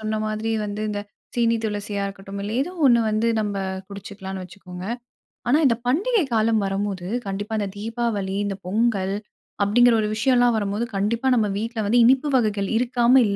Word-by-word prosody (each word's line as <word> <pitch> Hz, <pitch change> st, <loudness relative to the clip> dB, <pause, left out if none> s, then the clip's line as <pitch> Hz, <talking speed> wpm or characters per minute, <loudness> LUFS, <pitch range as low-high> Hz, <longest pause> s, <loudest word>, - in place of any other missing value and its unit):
சொன்ன 215 Hz, 0 st, -2 dB
மாதிரி 215 Hz, +1 st, -2 dB
வந்து 210 Hz, +1 st, -4 dB
இந்த 205 Hz, -1 st, -2 dB, 0.4 s
சீனி 230 Hz, -1 st, +3 dB
துளசியா 205 Hz, -1 st, -2 dB
இருக்கட்டும், 195 Hz, 0 st, -7 dB
இல்ல 205 Hz, +2 st, -4 dB
ஏதோ 330 Hz, +7 st, -2 dB
ஒன்னு 240 Hz, -2 st, +6 dB
வந்து 215 Hz, +2 st, +1 dB
நம்ம 205 Hz, -1 st, -2 dB, 0.3 s
குடிச்சுக்கலான்னு 200 Hz, -1 st, -7 dB
வச்சுக்கோங்க. 180 Hz, -1 st, -10 dB, 0.7 s
ஆனா 285 Hz, -, +5 dB
இந்த 240 Hz, -4 st, +4 dB
பண்டிகை 395 Hz, -, +2 dB
காலம் 220 Hz, -1 st, +3 dB
வரும்போது, 195 Hz, -2 st, -2 dB, 0.2 s
கண்டிப்பா 205 Hz, +3 st, -3 dB
இந்த 200 Hz, -1 st, -2 dB
தீபாவளி 215 Hz, -3 st, -2 dB
இந்த 195 Hz, -1 st, -3 dB
பொங்கல் 200 Hz, -2 st, +1 dB, 0.5 s
அப்டிங்கிற 240 Hz, +3 st, +5 dB
ஒரு 210 Hz, -, -1 dB
விஷயோலாம் 245 Hz, 0 st, +3 dB
வரும்போது, 210 Hz, +3 st, -1 dB
கண்டிப்பா 225 Hz, +6 st, 0 dB
நம்ம 220 Hz, -3 st, +2 dB
வீட்ல 225 Hz, +2 st, -4 dB
வந்து 240 Hz, +3 st, +4 dB
இனிப்பு 265 Hz, +4 st, +4 dB
வகைகள் 205 Hz, -4 st, 0 dB
இருக்காம, 240 Hz, 0 st, +2 dB
இல் 200 Hz, -, 0 dB
215 Hz, 160 wpm, -23 LUFS, 200-235 Hz, 0.7 s, ஒன்னு